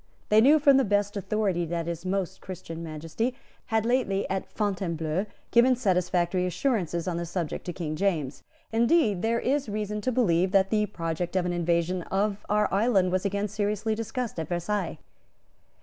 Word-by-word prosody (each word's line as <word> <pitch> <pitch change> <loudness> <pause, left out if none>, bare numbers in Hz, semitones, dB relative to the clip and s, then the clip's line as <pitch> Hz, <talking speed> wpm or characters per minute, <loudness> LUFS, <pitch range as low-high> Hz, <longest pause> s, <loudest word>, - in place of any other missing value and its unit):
They 215 +1 +6
knew 285 +6 +7
from 280 -2 +5
the 270 - +4
best 205 -1 +1
authority 200 -3 0
that 170 0 -2
His 170 +1 -4
Most 190 -1 -2
Christian 170 -3 -7
Majesty 165 +10 -3 0.3
had 220 -1 +1
lately, 230 -5 +1
at 190 0 -3
Fontainebleau, 180 -3 -1 0.2
given 250 +2 +5
satisfactory 180 -4 +1
assurances 180 - -1
on 175 -2 -1
this 170 -1 -4
subject 170 -4 -3
to 175 - -3
King 155 -4 -4
James. 155 -7 -1 0.3
Indeed, 230 - +3
there 230 +1 +1
is 275 -1 0
reason 210 0 -3
to 255 - 0
believe 185 -6 +2
that 195 -1 +4
the 210 -1 +2
project 170 -2 -3
of 185 -1 +2
an 175 - -1
invasion 175 +1 0
of 205 +1 0
our 210 0 +3
island 195 -3 +3
was 185 +1 0
again 200 +1 0
seriously 210 +1 -1
discussed 225 -1 -4
at 160 - -3
Versailles. 175 +1 -2
195 Hz, 170 wpm, -27 LUFS, 175-215 Hz, 0.3 s, knew